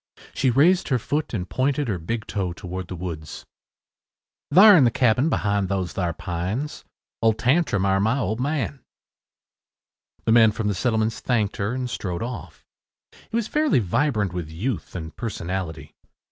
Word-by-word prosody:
She 130 - +1
raised 165 +9 +4
her 130 - +2
foot 145 +6 -2
and 90 -6 -3
pointed 135 +4 0
her 100 -5 -2
big 110 +7 -4
toe 95 -4 -2
toward 90 +1 -6
the 90 - -6
woods. 80 -3 -7 1.1
“Thar 200 +6 +9
in 155 - +6
the 120 - +5
cabing 125 +5 +2
behind 100 - 0
those 95 -2 -2
thar 90 -3 -1
pines. 90 - -4 0.4
Old 110 -1 +3
Tantrum 125 - +2
air 95 0 +2
my 110 +6 +2
old 110 -3 -1
man.” 140 0 -2 1.5
The - - +2
man 110 -2 +6
from 110 -1 -2
the - - +1
settlements 110 +2 0
thanked 110 -5 0
her 100 +4 -1
and 130 0 -2
strode 90 -5 -4
off. 100 -10 -7 0.6
He 225 - -5
was 230 -2 0
fairly 305 +3 +2
vibrant 105 - 0
with 85 -4 -4
youth 95 +5 -4
and 80 -3 -6
personality. 90 -9 -5
110 Hz, 160 wpm, -24 LUFS, 90-130 Hz, 1.5 s, Thar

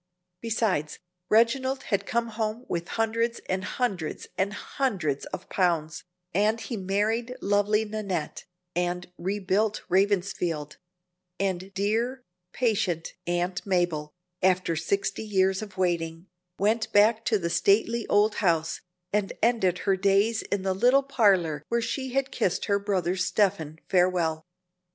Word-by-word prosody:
Besides, 215 -9 0 0.3
Reginald 260 +4 +3
had 200 - -1
come 235 -1 0
home 220 +2 -3
with 170 0 -3
hundreds 230 +1 0
and 185 0 -1
hundreds 195 -8 -2
and 195 +2 0
hundreds 195 - -2
of - - -7
pounds; 165 -4 0 0.3
and 215 +4 +2
he 235 - -5
married 215 +5 -1
lovely 205 +2 +2
Nannette, 200 -7 -4 0.3
and 175 0 -2
rebuilt 200 +3 0
Ravensfield; 180 -5 0 0.6
and 190 -1 -2
dear, 230 +6 0 0.3
patient 205 -9 0
Aunt 175 +1 -1
Mabel, 175 -5 0 0.3
after 185 -2 +2
sixty 195 +7 -1
years 190 -2 +1
of 205 -3 -9
waiting, 170 -2 -1 0.3
went 220 +3 +1
back 215 +2 +4
to 220 - +3
the 170 -3 -2
stately 225 +5 +2
old 210 +1 +3
house, 165 -4 +1 0.3
and 205 -2 0
ended 220 -7 +3
her 195 - +3
days 200 +4 +2
in 200 -2 -3
the 190 -1 +1
little 250 +8 +4
parlor 190 - +2
where 235 - +2
she 260 +3 -3
had 270 0 0
kissed 180 - 0
her 200 -1 +2
brother 190 -3 0
Stephen 185 -4 0
farewell. 175 -3 +1
195 Hz, 130 wpm, -27 LUFS, 180-220 Hz, 0.6 s, back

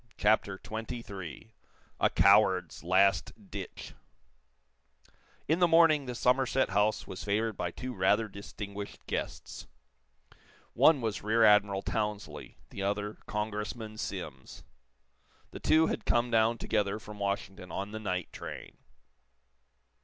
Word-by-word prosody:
CHAPTER 100 -2 +2
XXIII 110 - -7 0.5
A - - +4
COWARD'S 95 -5 +4
LAST 95 +3 +1
DITCH 95 -2 -7 1.5
In 160 +4 +2
the 175 - +5
morning 165 -4 +5
the 125 - -4
Somerset 130 +2 +2
House 105 +2 +1
was 95 - -7
favored 110 +2 0
by 90 - -2
two 125 +8 -6
rather 105 +3 +2
distinguished 100 0 -8
guests. - - -5 1.1
One 155 -5 +5
was 110 -3 -2
Rear 110 +2 +2
Admiral 105 -2 +4
Townsley, 105 0 -4
the 100 - -6
other 105 +1 -2
Congressman 105 +1 -4
Simms. 75 -12 -6 0.9
The - - -8
two 160 +1 +4
had - - -2
come 120 0 +2
down 115 +1 +3
together 105 -2 0
from 105 -1 -11
Washington 100 -3 -3
on 100 +4 -4
the 110 - -5
night 90 -4 -3
train. - - -8
105 Hz, 120 wpm, -30 LUFS, 100-115 Hz, 1.5 s, the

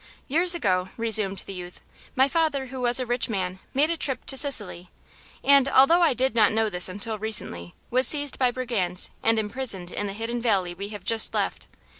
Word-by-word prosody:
"Years 345 +5 +5
ago," 185 - -1
resumed 215 -4 0
the 195 - -8
youth, 180 -1 -10 0.4
"my 265 +1 +3
father, 300 -3 -1
who 260 - -6
was 245 0 +1
a 255 - -3
rich 240 0 -2
man, 190 -3 -4
made 295 +5 +1
a - - -1
trip 270 -5 -1
to 270 - -1
Sicily 205 - 0 0.5
and, 280 -1 +4
although 275 +7 +4
I 325 -7 +3
did 260 -1 0
not 220 -3 +3
know 220 0 -1
this 180 0 +4
until 205 +3 -5
recently, 90 - -1 0.2
was 255 +2 +3
seized 290 -2 +1
by 255 -2 +3
brigands 230 -8 -3
and 225 0 +2
imprisoned 210 -5 -1
in 205 - -4
the 195 - -6
hidden 230 +3 -5
valley 195 -7 0
we 200 +3 -8
have 205 -3 -9
just 225 +1 +1
left. - - -3
225 Hz, 200 wpm, -24 LUFS, 195-265 Hz, 0.5 s, Years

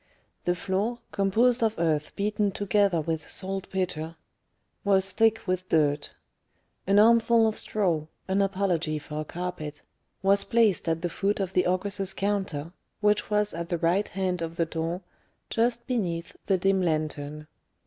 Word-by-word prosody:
The 175 - +2
floor, 200 +6 -1
composed 230 +5 +3
of 225 -1 +1
earth 155 -3 0
beaten 205 0 0
together 200 -3 +2
with 160 -1 -3
saltpetre, 185 -4 -2 0.7
was 195 -1 +2
thick 225 +3 +3
with 185 -1 -2
dirt; 145 -2 +1 0.7
an 200 +1 +4
armful 230 +1 +6
of 215 - -1
straw 170 -7 -1 0.2
an 190 +1 +2
apology 185 -5 0
for 150 0 -5
a - - -5
carpet 155 -4 -5 0.4
was 200 +1 +4
placed 220 -7 +2
at 165 +1 -1
the 175 - 0
foot 200 +4 -1
of 190 -1 -2
the 180 - +3
ogress's 190 +1 0
counter, 190 -6 -2 0.3
which 210 -1 +2
was 210 0 +1
at 170 0 -5
the 175 - 0
right 175 +5 +1
hand 185 -2 -2
of 165 0 -4
the 170 - +1
door, 165 +2 -3 0.5
just 235 +1 +1
beneath 175 -9 -2
the 195 - +3
dim 195 +1 +2
lantern. 150 -2 -2
190 Hz, 150 wpm, -27 LUFS, 165-205 Hz, 0.7 s, armful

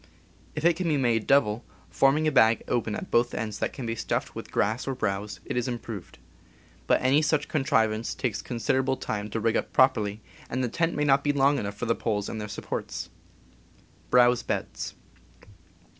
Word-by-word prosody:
If 150 - -3
it 170 0 +4
be 165 -5 +1
made 115 -5 +1
double, 120 -5 +3 0.3
forming 145 +3 +3
a - - +3
bag 110 -4 +4
open 115 -3 -1
at - - -7
both 120 +1 +2
ends 110 -1 -4
that - - -1
can 130 - -7
be 115 - -1
stuffed 115 - -2
with - - -8
grass 110 +6 0
or 135 - -1
browse, 105 -3 -3
it - - -4
is 125 0 0
improved; 115 -6 -6 0.7
but - - +4
any 135 +4 +4
such 155 -1 +1
contrivance 115 -7 +1
takes 110 -4 -2
considerable 130 +2 0
time 105 0 -4
to 115 - -2
rig 115 0 +1
up - - -3
properly, 110 -5 +3 0.3
and 130 +1 -1
the 125 - 0
tent 165 +7 0
may 150 - 0
not 140 -1 +4
be 145 - +2
long 140 0 +3
enough 100 -1 -4
for 120 - -3
the 115 - +2
poles 105 -3 -2
and 110 - -5
their 105 - -4
supports. 105 - -5
120 Hz, 180 wpm, -27 LUFS, 110-135 Hz, 0.7 s, it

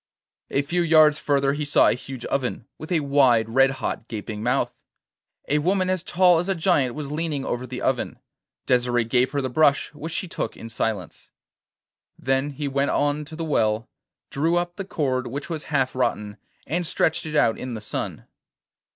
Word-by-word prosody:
A 140 - +1
few 175 +5 0
yards 155 -2 +5
further 140 -1 +1
he 150 +1 -3
saw 145 - +4
a - - +4
huge 130 +1 -8
oven, 125 -4 -2
with 155 - -8
a 165 -3 +2
wide, 130 -6 +3
red 135 +3 +5
hot 130 -3 -4
gaping 105 -1 -6
mouth. 125 +1 0 0.7
A 150 - +2
woman 185 +3 +1
as 185 -2 0
tall 180 -1 +4
as 180 +3 -3
a 195 - +1
giant 160 -8 +2
was 145 -2 -5
leaning 150 -3 -2
over 125 +1 -3
the 125 +1 -6
oven. 130 -2 -1 0.5
Desire 120 -1 +2
gave 125 +3 +1
her 145 - -1
the 130 - -1
brush, 145 +1 +3
which 155 +2 -7
she 185 - -3
took 175 - -4
in 115 - -8
silence. 110 -6 -4 0.9
Then 135 +2 0
he 145 0 -4
went 140 +1 0
on 145 +1 0
to 160 +2 -10
the 165 0 -4
well, 110 -6 +1 0.4
drew 160 +5 +1
up 175 0 -1
the 195 - -5
cord, 130 -8 -1
which 140 +6 -6
was 160 -2 -4
half 135 -4 0
rotten, 105 -5 -1 0.3
and 170 +4 -1
stretched 160 0 +1
it 155 - -5
out 115 -6 +3
in 125 -2 -5
the - - -5
sun. 105 - -5
140 Hz, 190 wpm, -24 LUFS, 125-155 Hz, 0.9 s, yards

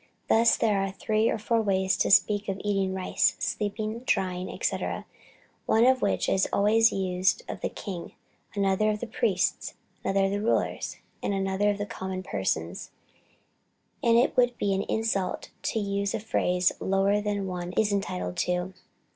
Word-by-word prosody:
Thus 230 +1 +5
there 210 -3 +2
are 195 - -1
three 215 +3 0
or - - 0
four 225 +1 +1
ways 190 -2 +1
to - - +1
speak 205 0 +4
of 195 0 -2
eating 195 -2 0
rice, 190 -1 +1
sleeping, 215 +2 -2
dying, 185 -1 0
&c. - - +1 0.9
one 225 +2 +4
of 260 0 +4
which - - +1
is 190 - +2
always 225 +3 +4
used 190 - 0
of - - -6
the - - -1
king, 185 -5 -7 0.4
another 200 +1 +2
of 215 +2 -3
priests, 195 -6 0 0.3
another 195 0 +1
of 200 +1 -1
rulers, 230 - -1 0.2
and 200 - -1
another 195 +1 +1
of 205 0 -2
common 190 0 -5
persons, 85 - -2 1.1
and 230 0 +4
it 245 - +3
would 245 -1 +3
be 200 -1 0
an 190 - 0
insult 200 -5 -1
to - - -2
use 200 -1 -1
a - - -2
phrase 180 -4 +1
lower 195 +2 +2
than 205 -1 -2
one 180 -1 -4
is 210 +1 +2
entitled 90 - -3
to. 180 +1 -1
200 Hz, 160 wpm, -27 LUFS, 190-215 Hz, 1.1 s, Thus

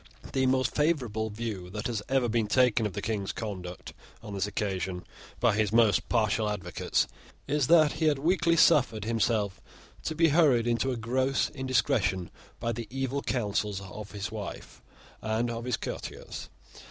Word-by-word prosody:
The 130 -1 +2
most 130 -1 +2
favourable 125 -9 0
view 105 -4 -5
that 105 +2 -5
has 115 -4 -1
ever 130 -2 +2
been 115 -1 +1
taken 125 -2 +3
of 100 - -8
the - - -5
King's 105 -4 -1
conduct 90 -5 -6 0.3
on 105 - -7
this 100 0 -1
occasion 95 -3 -3 0.3
by 120 -3 +3
his 105 -2 +1
most 110 -4 +3
partial 110 -2 +2
advocates 95 -4 -1 0.4
is 145 -2 +1
that 155 -2 +6
he 160 - -1
had 150 -2 +3
weakly 170 +3 +2
suffered 130 -9 +4
himself 110 -3 0 0.4
to 160 - -2
be 165 0 +4
hurried 145 -7 +4
into 120 +2 +1
a 125 - -2
gross 130 +4 0
indiscretion 120 - 0 0.3
by 115 0 -1
the 115 0 -5
evil 135 +1 -2
counsels 105 -5 -1
of 100 +2 -8
his 105 +1 -4
wife 105 -3 -7 0.4
and 110 +2 0
of 115 0 -5
his 125 - 0
courtiers. - - -6
115 Hz, 165 wpm, -29 LUFS, 105-130 Hz, 0.4 s, that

